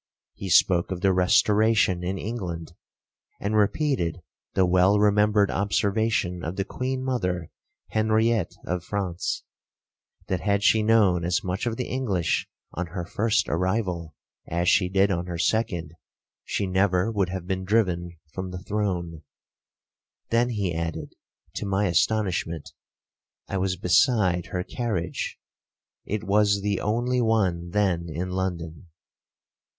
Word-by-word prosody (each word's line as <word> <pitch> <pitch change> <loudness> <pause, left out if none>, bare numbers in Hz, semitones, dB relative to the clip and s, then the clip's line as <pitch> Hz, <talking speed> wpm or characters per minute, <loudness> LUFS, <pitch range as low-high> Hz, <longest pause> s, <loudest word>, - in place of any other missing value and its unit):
He 95 - -6
spoke 90 -1 +4
of 95 -2 -4
the 95 -2 +3
Restoration 105 -1 +3
in 95 +2 -2
England, 90 -7 -5 0.7
and 105 +2 -1
repeated 105 - +1 0.3
the 95 - +4
well 95 +3 +4
remembered 105 0 +3
observation 100 -2 0
of 80 +4 -4
the 95 0 -1
queen 130 +3 -3
mother, 90 - -2 0.4
Henriette 110 -1 +1
of 90 0 -2
France,—that, 95 0 -6
had 100 -1 +1
she 110 - +5
known 105 -6 +3
as 90 +1 0
much 95 +5 -2
of 115 -1 -2
the 125 - -3
English 110 -10 -1 0.2
on 90 +1 -3
her 90 0 -5
first 110 +4 +1
arrival, 90 - -1 0.3
as 85 +1 -1
she 90 0 +4
did 95 +1 +3
on 85 -1 -2
her 85 -1 -4
second, 85 -6 0 0.5
she 100 - -2
never 95 +2 +2
would 100 -4 0
have 95 -1 -5
been 95 0 -2
driven 90 -4 0 0.2
from 95 0 -4
the 90 - -6
throne; 90 -7 -2 1.1
then 120 +1 +3
he 100 -7 -1
added, 80 -2 -4 0.4
to 105 - -4
my 100 +1 +1
astonishment, 90 -3 0 0.7
I 95 - -2
was 95 0 0
beside 90 -1 +2
her 90 0 -3
carriage,1 95 -7 -3 0.8
it 105 - -4
was 100 0 +3
the 100 -2 0
only 120 +4 0
one 95 -7 +1
then 90 -3 0
in 90 +4 -4
London. 85 -3 -4
95 Hz, 135 wpm, -25 LUFS, 90-105 Hz, 1.1 s, she